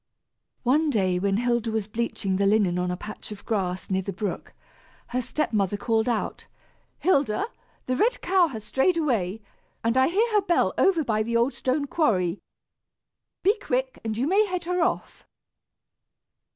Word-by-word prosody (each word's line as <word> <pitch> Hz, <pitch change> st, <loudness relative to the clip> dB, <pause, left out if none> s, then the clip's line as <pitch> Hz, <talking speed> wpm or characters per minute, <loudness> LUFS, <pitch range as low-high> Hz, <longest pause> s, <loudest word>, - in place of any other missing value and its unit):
One 295 Hz, +5 st, +3 dB
day, 185 Hz, -8 st, +1 dB
when 195 Hz, +1 st, +1 dB
Hilda 235 Hz, -1 st, 0 dB
was 220 Hz, -2 st, -1 dB
bleaching 215 Hz, -4 st, -2 dB
the 200 Hz, 0 st, +2 dB
linen 195 Hz, -4 st, +3 dB
on 180 Hz, 0 st, -1 dB
a 180 Hz, -, -2 dB
patch 210 Hz, +2 st, -8 dB
of 205 Hz, -1 st, -9 dB
grass 190 Hz, -4 st, -2 dB
near 190 Hz, 0 st, +1 dB
the 195 Hz, -, -4 dB
brook, 195 Hz, +1 st, -5 dB, 0.5 s
her 250 Hz, +1 st, -1 dB
step 305 Hz, +2 st, -2 dB
mother 205 Hz, -1 st, +1 dB
called 225 Hz, +2 st, +1 dB
out, 230 Hz, -3 st, -2 dB, 0.5 s
"Hilda, 290 Hz, -, +1 dB, 0.4 s
the 255 Hz, -, 0 dB
red 465 Hz, -, +2 dB
cow 370 Hz, -2 st, +3 dB
has 225 Hz, -8 st, -7 dB
strayed 265 Hz, -, +1 dB
away, 225 Hz, -, 0 dB, 0.4 s
and 230 Hz, +1 st, +1 dB
I 260 Hz, 0 st, +5 dB
hear 435 Hz, +7 st, +1 dB
her 420 Hz, -, +5 dB
bell 360 Hz, -3 st, +2 dB
over 350 Hz, -5 st, +3 dB
by 215 Hz, -5 st, 0 dB
the 235 Hz, +2 st, 0 dB
old 235 Hz, +4 st, +2 dB
stone 275 Hz, +3 st, -1 dB
quarry. 205 Hz, -, +1 dB, 1.0 s
Be 415 Hz, +4 st, +3 dB
quick, 260 Hz, -7 st, -2 dB
and 220 Hz, -1 st, -3 dB
you 250 Hz, -, +1 dB
may 400 Hz, +7 st, +3 dB
head 365 Hz, -2 st, -3 dB
her 360 Hz, +1 st, -1 dB
off." 350 Hz, -, -2 dB
235 Hz, 170 wpm, -25 LUFS, 205-310 Hz, 1.0 s, I